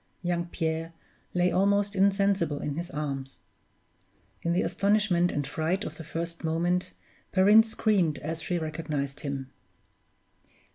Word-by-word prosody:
Young 175 -1 0
Pierre 165 -1 -2 0.4
lay 180 0 +3
almost 200 +2 +2
insensible 195 -5 +2
in 145 - -3
his 170 +4 -4
arms. 140 -4 -5 1.0
In 170 - 0
the 175 - +2
astonishment 200 -4 +2
and 145 - -1
fright 160 +7 -1
of - - -6
the 160 - -7
first 170 +2 -5
moment, 175 +3 0 0.4
Perrine 205 +3 +7
screamed 210 -7 +1
as 160 +2 -4
she 180 +1 -1
recognized 155 -3 -3
him. 140 -3 -5
170 Hz, 130 wpm, -28 LUFS, 155-190 Hz, 1.0 s, Perrine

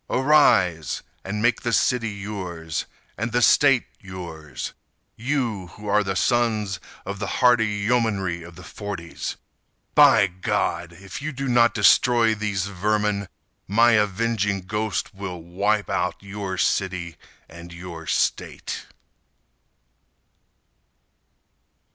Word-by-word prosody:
Arise! 115 - +3 0.2
And 105 +3 -3
make 120 -1 +2
the 120 - -1
city 115 0 +2
yours, 95 -6 -5 0.3
And 115 +2 -2
the 120 +1 +2
State 135 -2 +5
yours— 85 -6 -7 0.4
You 115 -7 -2
who 105 - -12
are 100 -2 +1
sons 110 -4 +1 0.3
of 100 +1 -5
the 105 - -3
hardy 120 -3 +4
yeomanry 105 -4 0
of 85 0 -11
the 90 - -12
forties! 100 -5 -6 0.6
By - - +7
God! 90 -2 -2
If 95 +7 -9
you 155 +2 -3
do 135 0 -4
not 120 -1 +4
destroy 115 +3 +5
these 105 -3 -2
vermin 100 +1 0 0.4
My 115 +5 +5
avenging 105 -1 +1
ghost 105 +3 -3
will 95 -2 -6
wipe 100 +5 0
out 90 +1 -1
Your 100 -2 -5
city 90 -4 -1 0.3
and 85 +1 -11
your 85 -2 -9
state. - - -2
100 Hz, 110 wpm, -23 LUFS, 90-115 Hz, 0.6 s, By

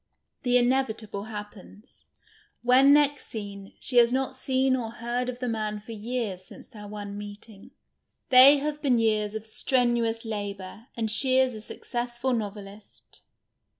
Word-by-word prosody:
The 245 0 +3
inevitable 240 -5 0
happens. 210 0 -11 0.6
When 260 +3 +6
next 290 -1 +3
seen, 200 -3 -8
she 250 - -1
has 235 0 +6
not 260 +1 -1
seen 260 0 +1
or 235 -3 -3
heard 240 +2 -2
of 250 - -5
the 250 0 -4
man 215 -2 -2
for 215 +3 -11
years 220 -4 -4
since - - -13
their 210 -4 -11
one 205 -1 -7
meeting. 205 0 -9 0.6
They 265 +3 +9
have 300 +1 -3
been 260 -5 +3
years 215 -2 +1
of 220 0 -5
strenuous 235 -1 0
labour, 205 0 -6
and 220 -2 -1
she 260 +3 +2
is 260 -1 +3
a 215 - -7
successful 240 +2 -3
novelist. 205 -2 -7
230 Hz, 150 wpm, -27 LUFS, 210-255 Hz, 0.6 s, They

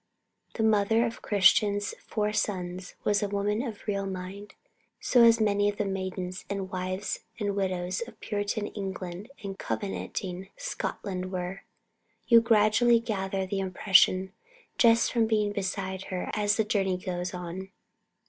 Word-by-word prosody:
The 220 - 0
mother 220 +1 +3
of 230 -1 -5
Christian's 205 +1 +3
four 210 -1 -2
sons 185 -3 -3
was 205 -1 +2
a 205 - 0
woman 205 +2 0
of 230 -6 -6
real 200 -1 -1
mind, 190 +2 -7 0.4
as - - -14
so 235 -2 +7
many 205 -1 +2
of 205 - -5
the 210 - 0
maidens, 185 -1 -4
and 195 -1 -3
wives, 185 +2 -3 0.2
and 205 -2 -1
widows 185 -1 -1
of 235 - -14
Puritan 205 0 -2
England 190 0 -6
and 195 -1 -6
Covenanting 115 - -4
Scotland 190 - -4
were. 185 +1 -4 0.6
You 230 -1 +7
gradually 230 +1 +4
gather 195 -4 -2
that 185 - -7
impression 190 -1 +3 0.5
just 230 -1 +5
from 230 -2 +3
being 210 -2 +1
beside 190 -1 -3
her 185 -1 -4
as 205 -1 +2
the 220 - +3
journey 195 -4 0
goes 180 -1 -3
on. 180 +2 -6
200 Hz, 145 wpm, -28 LUFS, 185-210 Hz, 0.6 s, so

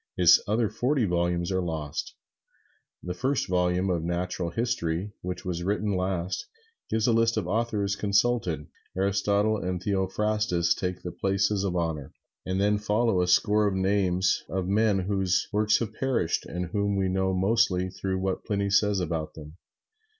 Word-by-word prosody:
His 90 -1 +7
other 110 +2 +2
forty 125 +3 +1
volumes 85 0 0
are 95 0 +1
lost. 80 -4 -4 0.9
The 90 - -3
first 130 +8 -1
volume 90 +1 +1
of 85 -2 0
the 80 - -4
"Natural 85 0 -2
History," 100 -4 -2
which 90 -1 -5
was 90 -2 -3
written 100 +2 0
last, 90 -1 -2 0.4
gives 110 -1 +1
a 120 - +3
list 115 0 +2
of 110 - +1
the - - -4
authors 105 -3 0
consulted. 100 -6 +1 0.3
Aristotle 100 +2 +1
and 90 -2 -3
Theophrastus 95 -2 0
take 90 -1 -4
the 90 - -4
places 100 +1 0
of 95 -3 -1
honor, 80 -5 -3 0.3
and 95 +1 -1
then 105 +1 +2
follow 105 -2 +1
a 90 - +1
score 105 +3 +3
of 100 - -1
names 95 -1 +1
of 95 -1 -2
men 105 +1 +2
whose 95 -1 0
works 105 +1 +3
have 110 -2 -4
perished 125 -10 -1
and 90 0 -4
whom 100 -1 0
we 95 -1 +1
know 95 0 0
mostly 95 -2 +2
through 95 0 -3
what 95 0 -2
Pliny 100 -2 -1
says 105 0 +3
about 80 -3 -3
them. 75 +1 -11
95 Hz, 165 wpm, -27 LUFS, 90-105 Hz, 0.9 s, His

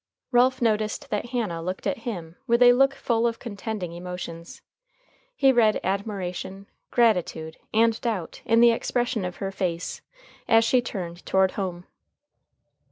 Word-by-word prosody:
Ralph 250 0 +3
noticed 220 +5 0
that 210 +3 -1
Hannah 225 -9 -2
looked 185 +3 -5
at - - -1
him 175 -9 -6
with 235 +1 +4
a 245 0 +8
look 270 +2 +3
full 235 -2 +1
of 230 -1 -2
contending 205 -5 -5
emotions. 175 -1 -8 0.7
He 270 - +5
read 225 -4 +3
admiration, 195 -1 -3 0.2
gratitude, 180 -8 +1
and 225 0 +2
doubt 210 -9 -3
in 230 0 +3
the 235 0 +7
expression 240 -1 -1
of 180 -1 -4
her 195 +1 -4
face, 180 -3 -3 0.5
as 225 0 +5
she 250 +2 +3
turned 180 -6 -6
toward 190 0 +3
home. 180 -3 -4
215 Hz, 145 wpm, -25 LUFS, 180-235 Hz, 0.7 s, a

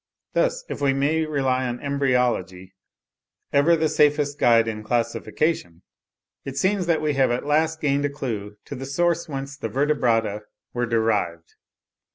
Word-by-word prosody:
Thus, - - +1
if - - -6
we 140 -1 +3
may 155 +4 +1
rely 130 -3 0
on 120 0 -4
embryology, 125 - -1 0.8
ever 145 +4 +5
the 160 -1 +1
safest 145 -1 +2
guide 115 -1 +4
in 110 -1 -4
classification, 115 - -1 0.6
it 135 0 -7
seems 190 -2 +1
that 160 -2 +1
we 150 -1 +1
have 135 -1 +3
at 120 +3 -1
last 160 +2 +1
gained 145 -1 +1
a - - 0
clue 110 -8 -5
to - - -7
the 135 +1 -6
source 170 +4 0
whence 135 -1 -5
the 115 - -5
Vertebrata 115 -6 +1 0.3
were 120 0 -1
derived. 105 -8 -1
135 Hz, 155 wpm, -23 LUFS, 115-150 Hz, 0.8 s, ever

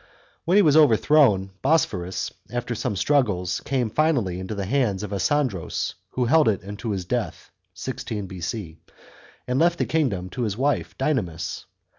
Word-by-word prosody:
When 175 - +2
he 205 - +7
was 150 -2 +4
overthrown, 125 -7 +4
Bosporus, 100 - 0 0.2
after 120 0 -3
some 115 -1 -2
struggles, 95 -8 +1
came 125 -5 0
finally 125 - +1
into 95 +3 -5
the 100 -1 -3
hands 105 -4 0
of 105 -1 -5
Asandros, 115 - -1 0.2
who 125 - 0
held 155 +5 +4
it 100 -5 +1
until 105 +4 -6
his 95 -4 -2
death - - -3 0.2
(c. 130 - -4
16 105 -5 -5
B.C.) 90 -1 -5 0.7
and 125 +1 0
left 170 +1 +3
the - - 0
kingdom 105 - -1
to 125 - -5
his 105 -3 -1
wife 140 +3 -1
Dynamis. 110 - -2
115 Hz, 160 wpm, -24 LUFS, 95-140 Hz, 0.7 s, he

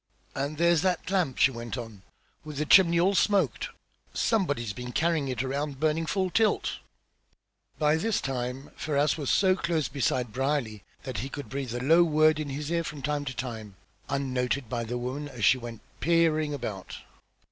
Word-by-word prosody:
"And 140 +2 -3
there's 170 -1 +4
that 185 -1 -1
lamp!" 180 -10 +1
she 130 - +5
went 115 0 -6
on, 115 -5 -8 0.4
"with 150 -2 -8
the 150 - 0
chimney 170 0 +6
all 190 +3 +3
smoked! 190 - +2 0.5
Somebody's 145 - 0
been 125 +1 -6
carrying 160 -3 +1
it 130 -1 -2
around 140 +1 -3
burning 160 +1 +1
full 190 0 0
tilt." 220 +2 +1 1.0
By 150 0 +3
this 220 +6 0
time 130 +1 -4
Ferrars 145 -1 +1
was 145 -4 -3
so 190 -1 +4
close 170 -4 -1
beside 125 -4 -1
Brierly 130 -5 -1 0.2
that 130 -2 -4
he 135 - -4
could 145 0 -7
breathe 135 -3 -4
a - - -2
low 165 +5 +6
word 155 -1 +3
in 150 -2 -3
his 145 +3 -4
ear, 170 0 +1
from 150 -3 -7
time 150 -1 -1
to 135 -2 -5
time, 110 -6 -6 0.3
unnoted 130 -1 -1
by 120 -2 -2
the 120 +2 -3
woman 130 +4 -4
as 125 -6 -2
she 130 - +5
went 115 -2 -8 0.2
peering 160 -2 +2
about. 105 -9 -5
145 Hz, 180 wpm, -28 LUFS, 125-160 Hz, 1.0 s, chimney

